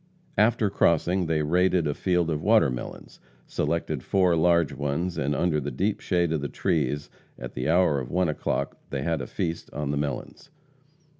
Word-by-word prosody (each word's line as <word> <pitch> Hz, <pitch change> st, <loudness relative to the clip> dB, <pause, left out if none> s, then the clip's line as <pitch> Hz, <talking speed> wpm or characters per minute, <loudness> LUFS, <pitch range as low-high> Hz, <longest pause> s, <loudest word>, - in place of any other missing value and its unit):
After 110 Hz, -1 st, +3 dB
crossing, 90 Hz, 0 st, +2 dB
they 80 Hz, -1 st, +1 dB
raided 90 Hz, +2 st, +2 dB
a 75 Hz, -, 0 dB
field 90 Hz, -1 st, 0 dB
of 75 Hz, -1 st, -2 dB
watermelons, 85 Hz, -, 0 dB, 0.3 s
selected 75 Hz, -2 st, -2 dB
four 90 Hz, +1 st, +2 dB
large 85 Hz, -2 st, +3 dB
ones, 75 Hz, +6 st, -2 dB
and 75 Hz, +2 st, -1 dB
under 85 Hz, -3 st, +1 dB
the 70 Hz, -, -3 dB
deep 95 Hz, -, -1 dB
shade 85 Hz, -3 st, 0 dB
of 80 Hz, -3 st, 0 dB
the 70 Hz, -, -3 dB
trees, 75 Hz, 0 st, -1 dB, 0.3 s
at -, -, -7 dB
the 65 Hz, +3 st, -2 dB
hour 80 Hz, -4 st, +3 dB
of 65 Hz, -2 st, -6 dB
one 90 Hz, +4 st, +1 dB
o'clock, 75 Hz, -, -2 dB
they 70 Hz, -1 st, -3 dB
had 80 Hz, -2 st, -1 dB
a 60 Hz, -, -5 dB
feast 85 Hz, 0 st, -4 dB
on 75 Hz, -1 st, -2 dB
the 70 Hz, -, -1 dB
melons. 70 Hz, -, -4 dB
80 Hz, 175 wpm, -26 LUFS, 70-90 Hz, 0.3 s, After